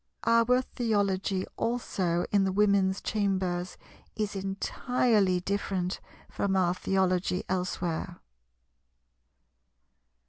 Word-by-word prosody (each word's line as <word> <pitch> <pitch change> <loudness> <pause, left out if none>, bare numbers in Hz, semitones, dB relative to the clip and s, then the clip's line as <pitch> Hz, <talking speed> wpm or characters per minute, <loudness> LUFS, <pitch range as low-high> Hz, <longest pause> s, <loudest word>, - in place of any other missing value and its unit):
Our 230 +2 +4
Theology 200 -5 0
also 185 -7 -1
in 200 -1 +4
the 190 - +1
Women's 200 -1 +2
chambers 190 -4 -1 0.4
is 210 -2 -2
entirely 195 0 +1
different 190 -1 -2 0.3
from 195 -1 -1
our 180 -2 +3
Theology 185 -1 0
elsewhere. 175 -2 -2
195 Hz, 80 wpm, -29 LUFS, 185-205 Hz, 0.4 s, Our